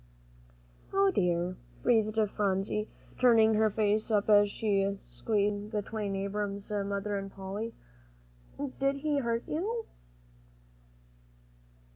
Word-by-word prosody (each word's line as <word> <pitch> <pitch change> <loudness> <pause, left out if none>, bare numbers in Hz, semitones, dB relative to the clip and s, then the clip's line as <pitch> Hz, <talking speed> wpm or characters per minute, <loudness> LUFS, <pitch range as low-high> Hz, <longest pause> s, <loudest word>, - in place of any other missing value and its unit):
"O 390 0 +4
dear," 180 - 0 0.3
breathed 220 -2 +2
Phronsie, 200 +1 -1 0.3
turning 225 -3 +6
her 220 0 +3
face 215 +1 +1
up 210 -1 +1
as 205 0 +6
she 200 -2 +1 0.2
sat - - -27
squeezed 210 -2 0
in - - -10
between 210 -1 -3
Abram's 200 +1 -3
mother 200 0 -1
and 195 0 -7
Polly, 195 +4 -5 1.0
"did 275 0 +1
he 295 0 0
hurt 235 -2 -1
you?" 440 +9 -2
210 Hz, 110 wpm, -30 LUFS, 200-230 Hz, 1.0 s, turning